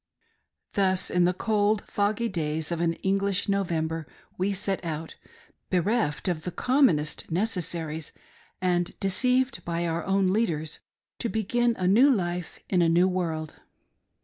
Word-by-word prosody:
Thus 190 -2 +1
in 180 -1 +3
the 180 - +2
cold, 210 0 +1
foggy 210 +3 0
days 160 -4 -2
of 170 -1 -1
an 165 -1 +2
English 195 0 +1
November 165 -5 -1 0.3
we 190 +2 0
set 195 -1 -2
out, 160 -1 -5 0.5
bereft 185 -3 0
of 175 -4 0
the 180 - -4
commonest 180 - +2
necessaries, 165 -5 -2 0.5
and 175 -1 0
deceived 255 +7 +2
by 170 0 -2
our 165 0 -1
own 195 0 +2
leaders, 160 -9 -1 0.4
to 235 - -1
begin 235 +2 +1
a 185 - 0
new 235 +9 +6
life 180 -7 -1
in 180 -2 +2
a 165 - +4
new 175 +3 +4
world. 165 -4 -3
180 Hz, 140 wpm, -27 LUFS, 165-205 Hz, 0.5 s, new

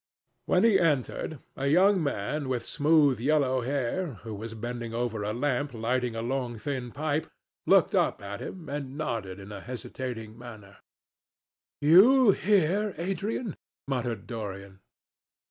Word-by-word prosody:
When - - +3
he 225 -4 +5
entered, 155 0 0 0.2
a 135 - -2
young 185 +5 +5
man 140 +1 -2
with 125 -3 -1
smooth 145 -4 +3
yellow 130 -1 +2
hair, 140 +4 -2
who 110 -2 -6
was 110 +2 -7
bending 120 0 -5
over 115 -3 -2
a 105 - -1
lamp 135 +2 -1
lighting 120 +1 -1
a 115 - -3
long 125 -1 -2
thin 130 0 -4
pipe, 155 +2 -2 0.4
looked - - +5
up - - +2
at 100 0 -6
him 175 -5 -7
and 140 -1 -5
nodded 115 -11 -3
in 100 +1 -10
a 100 -2 -7
hesitating 120 -2 -6
manner. 110 -5 -11 1.0
"You 205 - +7
here, 200 +1 +2
Adrian?" 195 +4 -3 0.3
muttered 120 -6 -2
Dorian. 100 -4 -7
130 Hz, 140 wpm, -28 LUFS, 115-155 Hz, 1.0 s, You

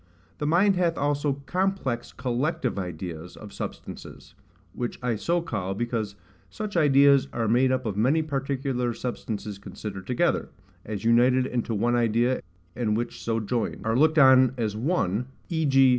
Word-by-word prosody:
the 150 - -1
mind 190 +5 +4
hath 170 -2 +1
also 145 -1 0
complex 180 -9 -1
COLLECTIVE 130 0 -1
ideas 90 -1 -6
of 105 -2 -11
substances; - - -8 0.4
which 120 -1 -4
I 120 -2 +1
so 170 +12 0
call, 95 - -3
because 115 -2 -2 0.3
such 215 -2 -6
ideas 140 -3 +5
are 115 -2 -1
made 125 +4 +3
up 130 -1 0
of 105 -3 -2
many 135 +10 +2
particular 135 -4 -2
substances 110 -4 -5
considered 100 -1 -7
together, 165 +8 +1 0.3
as 105 -1 -5
united 125 +2 +4
into 120 -3 -2
one 120 +4 +1
idea, 120 +2 +2 0.3
and 110 -3 0
which 120 - -4
so 115 -1 0
joined; 115 +1 -2
are 110 0 +1
looked 155 +4 +4
on 130 -2 +6
as 110 -3 -1
one; 120 - 0 0.2
v. 160 -2 0
g. 135 -1 +6
125 Hz, 155 wpm, -26 LUFS, 110-140 Hz, 0.4 s, on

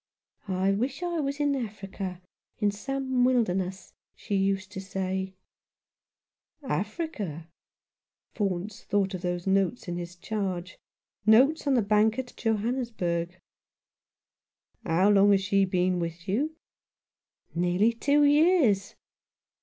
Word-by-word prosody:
' - - -36 0.2
I 195 - +4
wish 255 - -2
I 345 -2 -1
was 280 -1 -2
in 290 -1 +2
Africa 195 -6 -5 0.2
— - - -54
in 210 -2 +2
some 260 +4 -1
wilderness,' 190 -7 0 0.2
she 205 - -4
used 195 0 0
to 190 -1 -6
say." 190 0 -3 0.6
" - - -67 0.6
Africa! 210 - -3 0.4
" - - -56
Faunce 200 0 -2
thought 200 -1 0
of 185 - -4
those 175 -1 -2
notes 195 +3 +1
in 175 0 -3
his 175 0 -6
charge 185 -2 -4 0.2
— - - -51
notes 290 +5 +3
on 275 - +4
the 235 - +3
Bank 215 +2 +3
at 255 -1 -5
Johannesburg. 220 -7 -1 0.7
" - - -67 0.7
How 185 +5 +3
long 200 0 +5
had 200 -1 +4
she 195 0 +2
been 180 -1 +1
with 170 0 -5
you? 285 +11 0 0.5
" - - -49
"Nearly 180 +6 +2
two 285 +5 +3
years." 290 - +4
200 Hz, 140 wpm, -27 LUFS, 185-250 Hz, 0.7 s, long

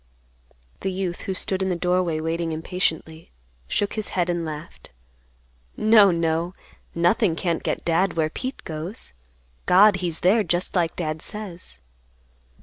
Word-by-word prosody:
The 190 - -2
youth, 185 -2 -3
who 190 - -3
stood 190 +1 -1
in 190 - 0
the 180 - 0
doorway 180 -2 +1
waiting 165 +1 -2
impatiently, 160 -1 -3 0.4
shook 205 - 0
his 215 -2 -3
head 175 -1 +2
and 175 -1 -2
laughed, 155 0 -8 0.9
"No, 215 -2 +6
no; 165 +1 0 0.4
nothing 175 +2 +3
can't 170 -1 -1
get - - -3
Dad 175 +3 +2
where 155 -2 0
Pete 260 +8 -5
goes. 160 - -5 0.5
God 200 +2 +7
he's 175 -3 -2
there 200 +5 +4
just 175 -1 -1
like 170 -3 +1
Dad 155 -2 -3
says." 180 - -4
175 Hz, 145 wpm, -24 LUFS, 165-190 Hz, 0.9 s, God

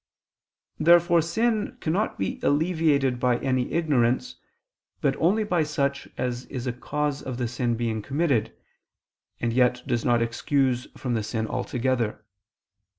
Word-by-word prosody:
Therefore 170 +1 +5
sin 220 +8 0
cannot 185 +5 -1
be 95 - -3
alleviated 145 -5 +2
by 125 -1 +2
any 130 -1 -1
ignorance, 150 - +1 0.6
but 140 -4 +1
only 205 +7 +2
by 180 -5 +1
such 140 -2 -1
as 125 0 -2
is 130 -2 -6
a 125 - -1
cause 145 +3 -2
of 130 -2 -5
the 125 -1 -1
sin 120 0 -1
being 115 -2 -1
committed, 140 -2 0 0.9
and 115 -1 -1
yet 125 0 +2
does 120 -2 -1
not 120 -1 +3
excuse 125 +2 0
from 125 -2 -2
the 115 - 0
sin 110 +1 -2
altogether. 120 -2 -2
130 Hz, 140 wpm, -25 LUFS, 120-160 Hz, 0.9 s, Therefore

